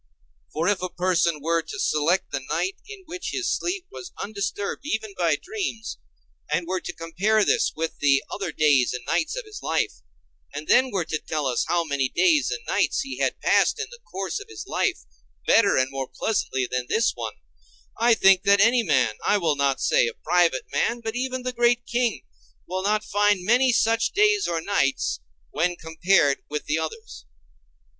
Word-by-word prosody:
For 160 +3 -1
if 205 -2 +1
a 185 - -2
person 175 -4 0
were 165 +1 +1
to 400 - -8
select 175 - +1
the 140 - -1
night 180 +4 -1
in 410 -2 -10
which 355 +2 -6
his 365 -3 0
sleep 360 +1 -3
was 375 -2 -9
undisturbed 200 0 -4
even 220 -8 -3
by 170 -4 +2
dreams, 365 - -5 0.5
and 175 - 0
were 185 +1 -2
to - - -5
compare 175 +6 -1
with 210 - +4
this - - +2 0.3
the 140 -1 +3
other 200 - -3
days 145 -5 +3
and 125 -1 -6
nights 315 - 0
of - - -5
his 430 0 -10
life, - - -1 0.5
and 150 +1 -6
then 260 +1 +4
were 190 -7 -1
to 155 - -3
tell 155 -2 -3
us 125 -2 0
how 175 -1 +1
many 140 -4 -1
days 320 - +3
and - - -4
nights - - +1
he 270 0 -6
had - - 0
passed - - +3
in 440 +1 -4
the 485 - -12
course 195 - -5
of - - -12
his 110 -1 -8
life - - -1 0.4
better 205 -3 +4
and 130 0 +1
more 135 -1 -4
pleasantly 130 -11 -1
than 125 0 -3
this 225 +1 +2
one, - - -6 0.6
I 235 0 +4
think 195 -3 +5
that 200 +1 +4
any 235 +4 +5
man, 130 - +1
I 205 - +3
will 165 -6 +1
not 140 -1 +1
say - - +3
a 115 - -5
private 170 -5 +1
man, 235 +1 0
but 225 0 -4
even 255 0 -3
the 255 0 -3
great 240 0 +2
king, 240 -2 -1 0.4
will 185 +1 -3
not 210 +2 +1
find 205 -2 +1
many 250 +4 +4
such 225 -1 +2
days 415 0 +3
or 165 -1 -1
nights, 160 -7 0 0.3
when 175 +2 0
compared 160 -3 +2
with 150 0 -4
the 155 +2 0
others. 160 - -7
195 Hz, 190 wpm, -24 LUFS, 155-240 Hz, 0.6 s, think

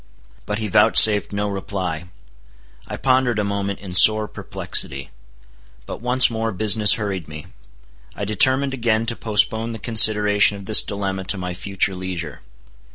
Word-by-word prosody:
But 105 0 -3
he 110 0 -4
vouchsafed 105 +1 +4
no 105 0 -3
reply. 95 -4 -5 0.8
I - - -7
pondered 130 -3 0
a 105 - -1
moment 100 -1 -4
in 95 -3 -9
sore 110 +3 +4
perplexity. 70 -8 -4 0.7
But - - -9
once 125 +1 +4
more 115 -1 -4
business 105 +1 +3
hurried 100 -6 -5
me. 75 -1 -10 0.7
I 100 - -5
determined 130 +7 +1
again 115 -3 -1
to 115 0 -4
postpone 110 +1 -1
the - - -7
consideration 105 -3 +3
of 100 - -12
this 110 +1 +7
dilemma 95 -2 -5
to 100 - -1
my 90 -1 -6
future 95 +1 -3
leisure. 90 -3 -7
105 Hz, 150 wpm, -19 LUFS, 95-110 Hz, 0.8 s, this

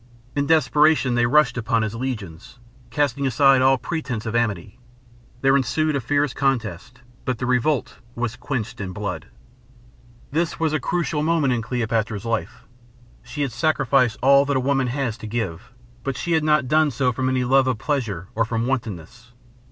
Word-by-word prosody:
In 140 -1 0
desperation 155 -3 +3
they 120 0 +2
rushed 130 -1 +3
upon 115 -1 0
his 110 -1 -3
legions, 110 -9 -6 0.3
casting 140 -1 0
aside 135 +1 +4
all 135 +1 +4
pretense 125 -6 -4
of 110 0 -3
amity. 105 -2 -2 0.6
There 135 0 +4
ensued 150 +3 +1
a 140 - -1
fierce 145 +3 0
contest, 125 -3 -2 0.2
but 125 -2 -2
the 125 - -3
revolt 130 +3 0 0.2
was 120 -1 -2
quenched 125 -3 -4
in 95 -1 -5
blood. 90 -5 -5 1.0
This 165 +3 -1
was 160 -2 0
a 155 - +1
crucial 165 0 -1
moment 155 -4 +2
in 120 - -1
Cleopatra's 115 -3 -2
life. 115 -1 -3 0.6
She 145 - -4
had 135 - -2
sacrificed 135 -4 +1
all 140 +1 +6
that 140 -1 0
a 130 0 -2
woman 135 -2 +2
has 125 -3 -2
to 110 - -7
give; 110 -1 -4 0.3
but 135 -2 -3
she 170 - -3
had 160 -2 +2
not 150 -3 +2
done 155 +2 +3
so 125 0 0
from 130 +2 -1
any 130 -1 +1
love 130 +1 +3
of 130 -3 0
pleasure 110 - -2
or 115 - +1
from 115 0 -2
wantonness. 115 -2 -5
125 Hz, 175 wpm, -22 LUFS, 115-140 Hz, 1.0 s, all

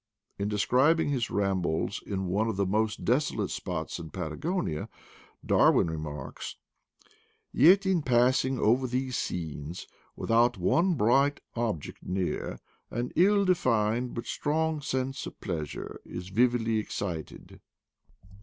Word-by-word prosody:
In 100 - 0
describing 130 +10 +3
his 130 -5 0
rambles 95 -2 -1
in 95 -2 -3
one 100 +5 0
of 110 - -1
the 100 0 +1
most 105 +2 0
desolate 130 +6 +1
spots - - -4
in 80 -2 -7
Patagonia, 80 - -3 0.6
Darwin 80 - +4
remarks: 75 -3 -6 1.0
"Yet, 190 +5 +6
in 190 -3 +2
passing 130 +1 +3
over 125 +4 +3
these 125 0 -2
scenes, 80 -3 -4 0.3
without 120 0 +2
one 170 - +2
bright 135 +4 +3 0.2
object 115 -10 -3
near, 90 0 -2 0.3
an 120 +2 -3
ill 200 +3 +4
de 185 - +5
fined 120 -4 0
but 115 - -4
strong 155 +1 -1
sense 130 -1 -2
of - - -11
pleasure 80 -7 -5
is 90 +1 -7
vividly 115 +1 +2
ex 105 - -6
cited." 85 -6 -6
115 Hz, 125 wpm, -28 LUFS, 95-135 Hz, 1.0 s, Yet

